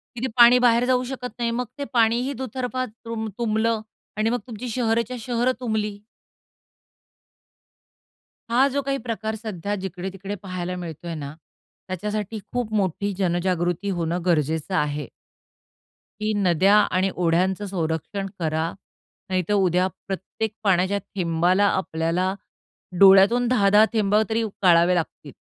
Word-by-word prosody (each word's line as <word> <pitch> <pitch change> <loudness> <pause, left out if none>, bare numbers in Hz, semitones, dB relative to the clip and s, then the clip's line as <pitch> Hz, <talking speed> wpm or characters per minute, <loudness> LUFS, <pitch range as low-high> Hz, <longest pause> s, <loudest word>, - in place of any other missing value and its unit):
की 235 - -6
ते - - +1
पाणी 240 +1 +8
बाहेर 240 -1 +4
जाऊ 250 0 +2
शकत 250 -1 -5
नाही. 235 -1 0
मग 245 +2 -2
ते 285 - -3
पाणीही 235 +3 +2
दुतर्फा 255 0 -3
तृम्ब 225 -1 -6
तुंबलं 225 -1 0 0.4
आणि 220 +1 +1
मग 245 - 0
तुमची 240 +1 -6
शहरच्या 235 +1 0
शहर 240 +2 0
तुंबली. 215 -4 -2 2.5
हा 260 +4 +5
जो 280 +1 -1
काही 275 0 -1
प्रकार 220 -2 -3
सध्या 205 -3 -4
जिकडे-तिकडे 190 +2 -5
पाहायला 180 -2 -4
मिळतोय 170 -1 -6
ना, 145 -2 -6 0.5
त्याच्यासाठी 210 +3 -3
खूप 240 -3 -2
मोठी 200 0 0
जनजागृती 175 0 0
होणं 175 -1 -1
गरजेचं 160 +1 0
आहे. 150 -3 -1 1.1
की 215 0 0
नद्या 195 0 +3 0.2
आणि 185 +1 +2
ओढ्यांचं 180 +3 +1
संरक्षण 185 +1 -3
करा, 160 0 -1 0.6
नाहीतर 185 +2 0
उद्या 185 -2 +3 0.2
प्रत्येक 195 +3 -4
पाण्याच्या 195 0 +2 0.2
थेंबाला 175 +2 +2
आपल्याला 180 0 0 0.7
डोळ्यातून 200 +5 +7
10-10 210 -3 +5
थेंबा 210 -1 +3
तरी 225 +1 +1 0.2
गाळावे 175 0 +5
लागतील. 155 -4 -4
200 Hz, 125 wpm, -23 LUFS, 180-230 Hz, 2.5 s, पाणी